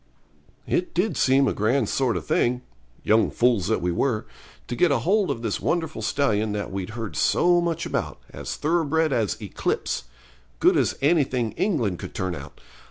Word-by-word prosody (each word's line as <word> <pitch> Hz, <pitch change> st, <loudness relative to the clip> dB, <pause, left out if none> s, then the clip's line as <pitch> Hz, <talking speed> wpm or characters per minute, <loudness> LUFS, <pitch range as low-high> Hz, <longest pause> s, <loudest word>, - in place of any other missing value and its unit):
It 180 Hz, -, -1 dB
did 185 Hz, +6 st, +1 dB
seem 135 Hz, +1 st, +3 dB
a -, -, +1 dB
grand 110 Hz, +3 st, +1 dB
sort 130 Hz, 0 st, 0 dB
of -, -, -6 dB
thing 125 Hz, +1 st, +1 dB, 0.4 s
young 110 Hz, +1 st, +3 dB
fools 120 Hz, -7 st, +2 dB
that -, -, 0 dB
we 90 Hz, -, +1 dB
were 110 Hz, +5 st, 0 dB, 0.4 s
to 120 Hz, -, -3 dB
get 175 Hz, +7 st, +3 dB
hold 185 Hz, -, +2 dB
of 115 Hz, -, -3 dB
this 110 Hz, -3 st, -1 dB
wonderful 160 Hz, -8 st, -1 dB
stallion 110 Hz, -3 st, 0 dB
that 105 Hz, -1 st, -4 dB
we'd 100 Hz, +4 st, -5 dB
heard 110 Hz, -3 st, -5 dB
so 175 Hz, 0 st, +3 dB
much 165 Hz, -1 st, -1 dB
of, -, -, -3 dB
as -, -, -5 dB
thoroughbred 160 Hz, -1 st, +1 dB
as 110 Hz, -4 st, 0 dB
Eclipse; 60 Hz, -, -2 dB, 0.5 s
good -, -, +4 dB
as -, -, +1 dB
anything 135 Hz, -7 st, +2 dB
England 120 Hz, -, -1 dB
could -, -, -8 dB
turn 95 Hz, -2 st, -2 dB
out. 70 Hz, -4 st, -9 dB
125 Hz, 170 wpm, -24 LUFS, 110-160 Hz, 0.5 s, good